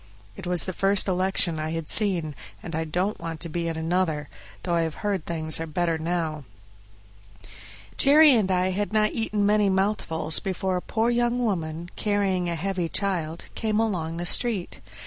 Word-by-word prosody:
It 175 - -8
was 180 -3 0
the 185 - -4
first 195 +2 +2
election 185 -3 +1
I 155 0 -3
had 165 -2 -4
seen, 180 -8 +2 0.3
and 170 - -7
I 160 0 -1
don't 180 +6 -2
want 165 -1 -6
to 170 - 0
be 170 +1 -3
in 165 -1 -3
another, 160 -3 -1 0.3
though 175 - -1
I 170 - +2
have 160 -2 -2
heard 195 -5 -1
things 160 -2 +1
are 165 - -4
better 165 +1 -1
now. 160 -2 -2 1.5
Jerry 295 +2 +7
and 215 -6 +2
I 185 0 +1
had 205 +3 -2
not 215 0 +2
eaten 215 -3 -1
many 210 -1 +3
mouthfuls 190 -5 +2
before 190 -1 -2
a - - -3
poor 230 +4 0
young 240 +1 +1
woman, 170 -4 -3
carrying 195 -4 0
a 170 - -2
heavy 180 0 -2
child, 170 -5 -1
came 215 -1 -1
along 170 -7 -1
the 175 - -4
street. 210 -2 0
180 Hz, 180 wpm, -25 LUFS, 165-205 Hz, 1.5 s, Jerry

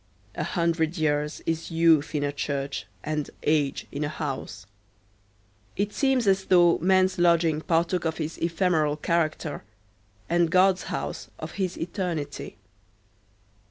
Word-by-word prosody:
A - - -3
hundred 170 0 0
years 150 -1 -1
is 165 0 -2
youth 165 -2 +3
in 145 - 0
a 145 - 0
church 140 -1 -3 0.2
and 155 -1 -2
age 150 -2 +1
in 145 +1 -3
a 145 - -1
house. 135 - -5 1.1
It 205 +1 -1
seems 265 -4 +2
as 190 -1 +2
though 175 -2 +5
man's 185 +1 +3
lodging 170 -3 +3
partook 170 +2 +1
of 160 -1 -1
his 160 0 -4
ephemeral 165 -3 +1
character, 155 -2 -1 0.6
and 170 0 +2
God's 185 +2 +3
house - - -4
of - - -7
his 185 -2 -3
eternity. 165 - -4
165 Hz, 130 wpm, -26 LUFS, 150-180 Hz, 1.1 s, though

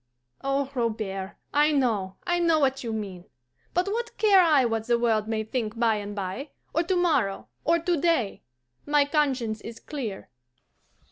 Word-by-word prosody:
Oh, 275 0 0
Robert, 215 -6 -2 0.2
I 295 +1 +4
know, 220 -10 +1
I 350 -1 +1
know 335 -2 +4
what 270 -2 +1
you 230 - -3
mean. 195 -5 -5 0.5
But 355 +1 +1
what 465 +3 -3
care 405 -3 +6
I 305 -7 +5
what 225 -1 -1
the 240 -1 +3
world 225 -3 +1
may 220 -1 -1
think 220 -1 -3
by 225 -2 +3
and 205 0 -6
bye, 200 +9 -4 0.2
or 330 - +3
to 360 +2 0
morrow, 235 - +1
or 335 +2 +3
to 340 +1 0
day? 320 - +1 0.5
My 290 -1 +4
conscience 265 -7 0
is 230 0 -8
clear." 240 -10 -6
250 Hz, 165 wpm, -26 LUFS, 215-310 Hz, 0.5 s, care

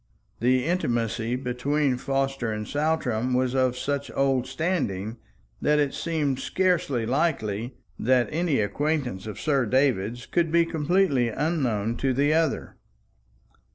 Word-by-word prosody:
The 125 +2 +2
intimacy 120 - 0
between 130 +2 0
Forster 135 -2 -1
and 105 -1 -4
Saltram 130 -6 0
was 130 0 +1
of 130 -2 +1
such 140 +1 -2
old 135 -2 +1
standing, 130 - -2 0.4
that 150 0 +3
it 145 -2 +1
seemed 150 -5 -1
scarcely 170 -12 0
likely 120 -5 -1 0.2
that 125 0 +3
any 160 -5 +1
acquaintance 125 -2 -1
of 105 -1 -6
Sir 140 -5 +1
David's 120 -2 +1
could 170 -2 0
be 170 0 +4
completely 160 -5 +2
unknown 120 -6 -1
to 135 -2 0
the 145 +3 +3
other. 160 -2 0
135 Hz, 125 wpm, -26 LUFS, 120-150 Hz, 0.4 s, be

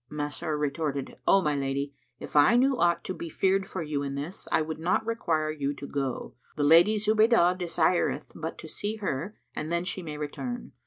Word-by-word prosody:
Masrur 150 +1 -3
retorted, 145 -1 -2
"O 195 -1 +5
my 150 -2 +1
lady, 140 +1 -2 0.3
if - - -9
I 145 +10 +6
knew 265 +2 +4
aught 170 -5 +2
to - - -3
be 170 - -6
feared 190 +3 +1
for 185 -3 -4
you 150 -2 -2
in 140 -1 -3
this, 150 +7 -6
I - - +4
would 155 0 -5
not 180 +6 +1
require 165 -9 0
you 145 -2 -2
to 140 - -8
go; 135 -3 -3 0.2
the 150 - 0
Lady 170 +8 +6
Zubaydah 215 -3 +4
desireth 175 0 +1
but - - -5
to - - -9
see 210 +2 -3
her 195 -2 -3 0.2
and 155 +2 -4
then 170 +1 0
she 185 +1 -3
may 155 -3 -6
return. 240 - -5
160 Hz, 200 wpm, -28 LUFS, 145-190 Hz, 0.3 s, I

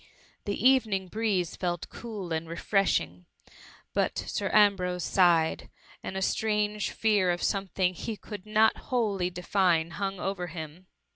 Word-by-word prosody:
The 200 - -2
evening 215 -8 +2
breeze 205 -6 -1
felt 175 -2 -3
cool 205 -7 -6
and 160 0 -3
refreshing; 125 - 0 0.7
but - - 0
Sir - - -2
Ambrose 185 -4 +3
sighed, 170 -4 +2 0.3
and 190 - -5
a 190 - -1
strange 210 0 0
fear 210 -4 +2
of 175 0 -1
something 190 -2 0
he 215 +4 -5
could 205 0 -9
not 215 +1 +4
wholly 205 -8 0
define 175 -2 +1
hung 195 0 -3
over 190 -2 -3
him. 160 +2 -8
190 Hz, 135 wpm, -28 LUFS, 175-210 Hz, 0.7 s, not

